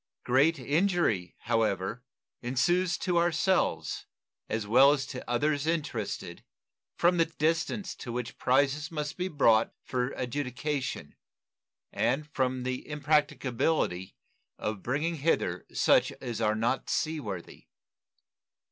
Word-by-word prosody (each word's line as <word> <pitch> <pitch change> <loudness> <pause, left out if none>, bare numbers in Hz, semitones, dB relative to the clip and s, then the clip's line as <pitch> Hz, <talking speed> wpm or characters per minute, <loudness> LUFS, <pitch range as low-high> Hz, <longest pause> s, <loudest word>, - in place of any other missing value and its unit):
Great 140 +6 +3
injury, 145 - +1
however, 110 +1 0 0.4
ensues 175 +9 +1
to 175 -2 +1
ourselves, 175 +2 +1 0.4
as 110 -1 -1
well 130 +6 +6
as 140 -2 0
to 130 -2 -7
others 145 +4 +1
interested, 145 -11 -3 0.5
from 175 +1 +3
the 165 - +4
distance 165 +6 -1
to 120 - -7
which 120 -1 -5
prizes 140 +4 +2
must 150 -2 -4
be 180 0 -2
brought 115 -9 +3
for 125 -1 -1
adjudication 130 +2 -3 0.8
and 135 +6 0
from 130 -1 0
the 130 +2 -4
impracticability 145 - 0 0.4
of 105 -2 -3
bringing 150 - -1
hither 155 +3 0
such - - +3
as 115 -2 -5
are 110 -1 +2
not 120 +4 -1
sea 160 -1 0
worthy. 95 - -7
135 Hz, 115 wpm, -29 LUFS, 120-160 Hz, 0.8 s, well